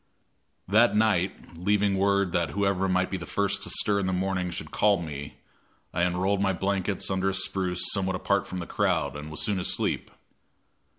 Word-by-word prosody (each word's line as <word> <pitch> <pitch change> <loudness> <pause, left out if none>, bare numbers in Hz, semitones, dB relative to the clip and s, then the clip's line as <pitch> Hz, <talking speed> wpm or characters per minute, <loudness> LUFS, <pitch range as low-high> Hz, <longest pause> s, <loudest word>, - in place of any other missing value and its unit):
That 110 +5 +4
night, 100 -5 0
leaving 100 +3 +1
word 100 -1 +2
that 85 -3 0
whoever 95 +1 0
might 90 0 +1
be 95 - -1
the - - -8
first 100 0 -1
to - - -2
stir 100 -1 +1
in 95 - -1
the 95 - 0
morning 90 -1 -1
should 85 - -6
call 100 -2 +3
me, 75 -4 -6 0.6
I 85 - 0
unrolled 90 +3 +1
my 95 -1 +2
blankets 95 +1 -1
under 95 0 +1
a 95 - -2
spruce 95 -2 0
somewhat 95 -2 0
apart 100 +2 0
from 95 - -6
the 90 - -4
crowd, - - 0
and 75 +1 -7
was 80 - -1
soon 100 -3 0
asleep. 90 - 0
95 Hz, 185 wpm, -27 LUFS, 90-100 Hz, 0.6 s, That